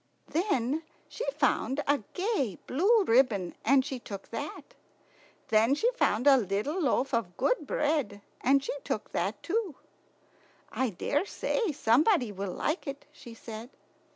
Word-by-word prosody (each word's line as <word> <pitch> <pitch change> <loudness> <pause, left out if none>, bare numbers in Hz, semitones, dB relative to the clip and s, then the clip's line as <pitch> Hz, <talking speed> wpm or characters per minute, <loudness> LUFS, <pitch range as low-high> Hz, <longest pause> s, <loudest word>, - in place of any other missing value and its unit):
Then 310 - 0 0.3
she - - -6
found 280 0 0
a 285 0 +2 0.2
gay 360 - -1
blue 405 - +3
ribbon, 225 - +2
and 270 -1 +4
she 270 -4 -4
took 200 -4 -9
that. - - -6 0.8
Then 225 +5 +4
she 465 +11 +2
found 250 - +1
a 280 -2 +8
little 225 - -1
loaf 270 -1 +1
of 195 -7 -1
good 340 - +1
bread, 285 -11 -1 0.2
and 275 +2 +4
she - - -3
took 215 - -3
that 195 +5 -2
too. 390 - -1 1.0
"I 260 -1 0
daresay 330 - -1
somebody 255 - +3
will 195 -1 -4
like 310 +2 -2
it," 275 0 -6
she 235 -2 -12
said. 225 +1 -8
270 Hz, 140 wpm, -29 LUFS, 225-310 Hz, 1.0 s, a